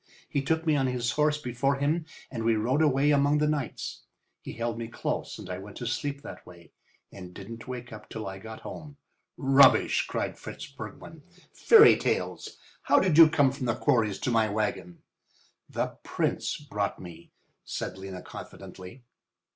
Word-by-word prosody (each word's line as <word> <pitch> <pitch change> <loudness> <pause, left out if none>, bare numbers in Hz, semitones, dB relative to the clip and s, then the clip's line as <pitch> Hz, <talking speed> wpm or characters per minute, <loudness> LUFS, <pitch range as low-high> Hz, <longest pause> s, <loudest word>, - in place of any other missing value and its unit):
He 140 - -1
took 160 +4 0
me 155 -2 +3
on 135 -2 +2
his 125 -2 -1
horse 150 0 +2
before 135 0 0
him 155 +4 0 0.2
and 115 -4 -4
we 115 0 +3
rode 125 +7 +1
away 145 -1 +3
among 145 +1 +3
the 150 - +2
knights. 150 -5 -3 0.4
He - - -8
held 115 0 -3
me 115 - -4
close 115 - -4
and - - -9
I 90 0 -5
went 100 +1 -10
to 120 - -5
sleep 140 +4 -3
that 90 - -9
way, 85 -2 -16 0.4
and 90 -2 -11
didn't 115 +3 -9
wake 125 -2 -7
up 105 0 -11
till 110 -1 -6
I 95 0 -6
got 110 +2 -9
home." 145 -2 -9 0.4
"Rubbish!" 135 0 +5
cried - - -3
Fritz - - -8
Bergmann. - - -10 0.3
"Fairy 445 -1 +7
tales! - - -2 0.2
How - - +4
did 185 -5 +2
you 165 -1 +10
come 145 -4 +3
from 135 -2 -4
the 115 - +1
quarries 115 -8 +1
to 125 - 0
my 110 -2 +3
wagon?" 100 -4 -3 0.7
"The - - -3
Prince - - -1
brought 105 -9 -3
me," 85 -2 -11 0.3
said - - -5
Lena, 95 -1 -7
confidently. 95 +8 -11
125 Hz, 175 wpm, -28 LUFS, 105-145 Hz, 0.7 s, you